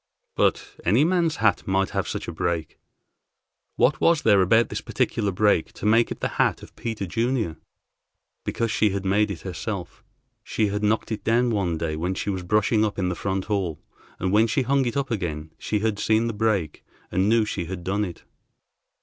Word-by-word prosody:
But -, -, 0 dB
any 115 Hz, -, +4 dB
man's 170 Hz, -3 st, +2 dB
hat 110 Hz, -6 st, +1 dB
might 95 Hz, 0 st, +1 dB
have -, -, -1 dB
such -, -, -4 dB
a -, -, -3 dB
break. 85 Hz, -2 st, -3 dB, 1.0 s
What 135 Hz, +1 st, +2 dB
was 165 Hz, -2 st, +3 dB
there 100 Hz, -3 st, +5 dB
about 115 Hz, +5 st, +4 dB
this -, -, -4 dB
particular 105 Hz, -3 st, -1 dB
break 100 Hz, -3 st, +2 dB
to -, -, -8 dB
make 115 Hz, +2 st, +4 dB
it -, -, -6 dB
the -, -, +1 dB
hat -, -, +1 dB
of -, -, -13 dB
Peter 110 Hz, -4 st, -4 dB
Junior? 115 Hz, -, -1 dB, 0.9 s
Because 115 Hz, -1 st, -1 dB
she 110 Hz, -, +3 dB
had 100 Hz, 0 st, -3 dB
made 105 Hz, +2 st, +2 dB
it 95 Hz, -5 st, -5 dB
herself. -, -, -5 dB, 0.4 s
She 110 Hz, -2 st, 0 dB
had 105 Hz, +1 st, -2 dB
knocked 110 Hz, +2 st, 0 dB
it 110 Hz, -, -3 dB
down 120 Hz, +2 st, +2 dB
one 95 Hz, -6 st, 0 dB
day 80 Hz, -1 st, -2 dB
when 90 Hz, +4 st, -2 dB
she 100 Hz, -, -2 dB
was 95 Hz, -1 st, -3 dB
brushing 105 Hz, +4 st, +2 dB
up 105 Hz, -2 st, -1 dB
in 90 Hz, -2 st, 0 dB
the 90 Hz, -, -2 dB
front 95 Hz, +1 st, -2 dB
hall, 95 Hz, -8 st, -1 dB, 0.4 s
and 95 Hz, 0 st, -1 dB
when 110 Hz, +3 st, +4 dB
she 130 Hz, +5 st, +1 dB
hung 135 Hz, +2 st, +2 dB
it 120 Hz, -, -2 dB
up 135 Hz, -2 st, -1 dB
again, 80 Hz, -7 st, -3 dB
she 105 Hz, -1 st, -1 dB
had 110 Hz, -2 st, 0 dB
seen 110 Hz, +2 st, +2 dB
the 115 Hz, -, -2 dB
break, 105 Hz, -8 st, -1 dB, 0.3 s
and 95 Hz, +3 st, +2 dB
knew 115 Hz, -1 st, +4 dB
she 95 Hz, -4 st, -3 dB
had 90 Hz, 0 st, -6 dB
done 100 Hz, +3 st, 0 dB
it. 90 Hz, -4 st, -6 dB
105 Hz, 200 wpm, -24 LUFS, 95-115 Hz, 1.0 s, there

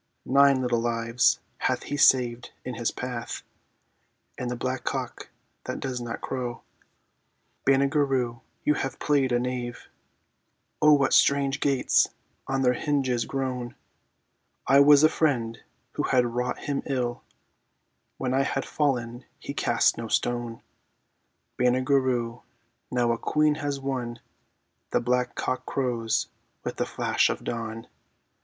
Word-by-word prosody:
"Nine 140 Hz, 0 st, +5 dB
little 120 Hz, -2 st, +1 dB
lives 115 Hz, 0 st, +2 dB, 0.2 s
hath -, -, 0 dB
he -, -, -4 dB
saved 125 Hz, -4 st, +3 dB
in 125 Hz, -, -4 dB
his 115 Hz, 0 st, -1 dB
path... 125 Hz, -2 st, -5 dB, 0.5 s
" -, -, -45 dB
And 125 Hz, -, -2 dB
the 125 Hz, -, -2 dB
black 130 Hz, +1 st, -3 dB
cock -, -, -4 dB, 0.4 s
that -, -, -4 dB
does 130 Hz, -2 st, -3 dB
not 115 Hz, -1 st, -5 dB
crow. 125 Hz, -3 st, -4 dB, 1.0 s
Banagher 140 Hz, +2 st, +4 dB
Rhue, 120 Hz, -3 st, -1 dB, 0.2 s
you 150 Hz, -, +3 dB
have 135 Hz, -2 st, -3 dB
played 140 Hz, -3 st, +1 dB
a 120 Hz, -, +3 dB
knave; 125 Hz, -1 st, -4 dB, 0.9 s
(O 150 Hz, 0 st, +7 dB
what 140 Hz, -2 st, +3 dB
strange 140 Hz, 0 st, +3 dB
gates 140 Hz, -2 st, +3 dB, 0.4 s
on 135 Hz, 0 st, 0 dB
their 125 Hz, -1 st, +4 dB
hinges 130 Hz, -4 st, 0 dB
groan!) 125 Hz, -3 st, -3 dB, 0.9 s
"I 135 Hz, -, +6 dB
was 145 Hz, +1 st, +7 dB
a -, -, +9 dB
friend 120 Hz, -8 st, 0 dB, 0.3 s
who -, -, -3 dB
had 125 Hz, -2 st, +2 dB
wrought 125 Hz, +1 st, -2 dB
him 140 Hz, -1 st, -2 dB
ill; 125 Hz, -3 st, -2 dB, 1.0 s
When 130 Hz, -1 st, -2 dB
I 135 Hz, -, +3 dB
had 135 Hz, 0 st, -1 dB
fallen 125 Hz, -4 st, -1 dB
he -, -, -7 dB
cast -, -, +2 dB
no 115 Hz, -, -4 dB
stone... 120 Hz, 0 st, -1 dB, 0.4 s
" -, -, -46 dB
Banagher 130 Hz, +2 st, +3 dB
Rhue, 120 Hz, -2 st, -2 dB, 0.5 s
now 120 Hz, -1 st, +1 dB
a 115 Hz, -, -1 dB
queen 150 Hz, 0 st, +2 dB
has 145 Hz, -1 st, -2 dB
won! 125 Hz, -3 st, -3 dB, 0.7 s
(The -, -, +2 dB
black 125 Hz, 0 st, 0 dB
cock 130 Hz, 0 st, -2 dB
crows 120 Hz, -4 st, 0 dB, 0.4 s
with -, -, -4 dB
the -, -, -1 dB
flash -, -, +1 dB
of -, -, -3 dB
dawn.) 115 Hz, -1 st, -4 dB
125 Hz, 140 wpm, -26 LUFS, 120-135 Hz, 1.0 s, a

